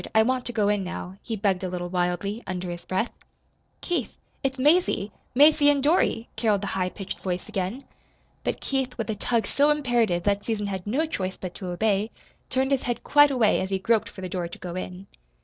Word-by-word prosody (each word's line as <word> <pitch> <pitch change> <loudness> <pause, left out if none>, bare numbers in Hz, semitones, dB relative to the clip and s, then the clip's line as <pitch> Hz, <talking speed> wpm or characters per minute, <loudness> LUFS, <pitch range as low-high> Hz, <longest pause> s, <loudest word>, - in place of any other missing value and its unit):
I 220 - +7
want 255 +1 0
to - - -2
go 215 -4 +1
in 205 -1 +2
now," 185 +1 -6
he 225 - -4
begged 195 -3 0
a 185 - -1
little 175 0 -3
wildly, 180 +4 -1
under 180 -1 -3
his 175 0 -6
breath. 190 +5 -1 0.7
"Keith, 325 - -1 0.3
it's 270 0 -1
Mazie 290 - +3 0.2
Mazie 295 +1 +7
and 285 -2 +3
Dorothy," 290 -7 +2
caroled 215 -3 +2
the 200 - -3
high 185 -1 0
pitched 195 +1 -7
voice 180 -1 -3
again. 215 +5 -3 0.6
But - - -2
Keith, 270 -2 -1
with 225 -2 -2
a - - -2
tug 230 +2 0
so 290 +1 +3
imperative 240 -11 +2
that 200 +1 +1
Susan 215 -2 -1
had 190 -1 -4
no 275 +10 +1
choice 190 -11 -3
but 185 -2 -6
to 185 - -7
obey, 200 +3 +1 0.4
turned 265 +1 +1
his 270 -2 +3
head 240 -1 -3
quite 290 0 +6
away 245 -6 +3
as 190 - -2
he 195 - +1
groped 220 +3 +1
for 190 - -10
the 185 - -3
door 180 -2 -2
to 170 - -9
go 175 -1 -6
in. 185 +1 -6
210 Hz, 215 wpm, -26 LUFS, 185-255 Hz, 0.7 s, I